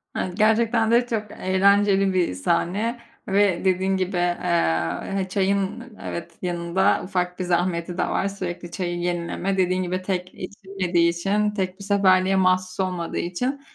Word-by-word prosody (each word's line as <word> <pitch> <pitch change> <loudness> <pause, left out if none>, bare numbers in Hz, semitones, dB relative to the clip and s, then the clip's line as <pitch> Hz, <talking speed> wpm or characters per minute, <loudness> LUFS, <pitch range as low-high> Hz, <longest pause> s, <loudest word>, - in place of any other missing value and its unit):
Evet, 185 +2 -3
gerçekten 225 +1 +3
de 240 +1 +4
çok 215 -3 -3
eğlenceli 195 +1 +3
bir 180 - +1
sahne 190 - -1 0.3
ve 195 -2 +2
dediğin 190 +1 +2
gibi, 185 0 -2
eee, 170 - 0
he 195 - 0
çayın, 200 +3 0 0.2
evet, 170 - -6
yanında 175 +1 +1
ufak 180 -1 -2
bir 185 - -1
zahmeti 175 0 -1
de - - +1
var: 195 - 0
Sürekli 180 -3 -6
çayı 175 -2 -3
yenileme. 175 +2 -2
Dediğin 185 0 +1
gibi, 185 +1 -2
tek 185 -1 -3
içilmediği 185 -3 -1
için, 200 +5 0
tek 190 -1 -3
bir - - -8
seferliğe 195 -1 +3
mahsus 185 0 +1
olmadığı 180 -3 -2
için, 250 +11 -2
185 Hz, 150 wpm, -23 LUFS, 175-200 Hz, 0.3 s, de